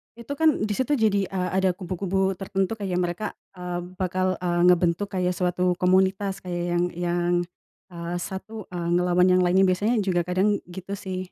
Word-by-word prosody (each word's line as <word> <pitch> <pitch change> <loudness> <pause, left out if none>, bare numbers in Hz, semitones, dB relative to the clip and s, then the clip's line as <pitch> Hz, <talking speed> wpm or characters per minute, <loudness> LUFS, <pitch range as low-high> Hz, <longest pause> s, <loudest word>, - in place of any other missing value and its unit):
itu 235 +3 -10
kan 320 0 +6
di 210 - -1
situ 260 +5 +1
jadi, 205 -5 +2
eee, 180 -1 -2
ada 190 0 +3
kubu-kubu 190 +1 -1
tertentu 195 +3 -2
kayak 185 -3 -1
mereka, 175 +4 -3 0.3
eee, 180 -2 -5 0.2
bakal, 185 0 0
eee, 175 -1 0
ngebentuk 180 +2 +3
kayak 180 -1 0
suatu 180 0 +1
komunitas 190 +2 +2
kayak 175 -1 -4
yang 175 - +2
yang, 175 0 0 0.6
eee, 170 0 -5
satu, 215 +4 -6
eee, 175 -1 -3
ngelawan 180 0 +3
yang 185 0 +4
lainnya 185 +2 +4
biasanya 205 +6 +1
juga 185 -4 +1
kadang 185 +4 +1 0.2
gitu 190 +2 -6
sih. 185 -2 -6
185 Hz, 170 wpm, -25 LUFS, 180-195 Hz, 0.6 s, kan